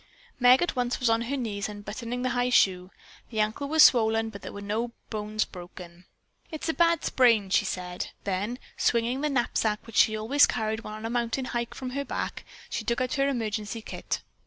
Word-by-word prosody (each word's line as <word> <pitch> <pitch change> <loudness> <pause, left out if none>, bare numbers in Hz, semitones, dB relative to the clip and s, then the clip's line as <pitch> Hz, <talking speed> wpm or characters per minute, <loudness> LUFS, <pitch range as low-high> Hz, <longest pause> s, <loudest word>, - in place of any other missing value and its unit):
Meg 250 +4 +6
at 350 - -2
once 245 -1 -1
was 250 -2 +2
on 225 0 +2
her 265 +4 -2
knees 210 -5 -3
unbuttoning 220 +4 -5
the 255 - 0
high 245 0 +1
shoe. 185 -6 +3 0.4
The 220 - -4
ankle 215 +7 0
was 315 +1 +6
swollen, 225 -2 +4
but 200 - -10
there - - -7
were 200 - -8
no 220 +4 -2 0.2
bones 215 0 -1
broken. 175 -1 -11 0.4
"It 315 - -7
is - - -2
a - - +2
bad 335 0 +2
sprain," 230 -7 +3
she 205 - +3
said. 180 -1 -4 0.2
Then, 205 +5 -2 0.2
swinging 240 +3 +1
the 300 - +1
knapsack 230 -5 0
which 230 -1 -7
she 215 0 +5
always 255 +7 +4
carried 220 -1 -1
when 215 -1 -7
on 215 +1 -7
a - - -2
mountain 240 +2 -1
hike 235 -1 -3
from 255 -1 -5
her 280 +2 -2
back, 265 - -4 0.2
she - - -4
took 235 +2 0
out 255 -1 -1
her 275 0 +2
emergency 220 -3 -3
kit. - - -4
230 Hz, 205 wpm, -27 LUFS, 210-250 Hz, 0.4 s, Meg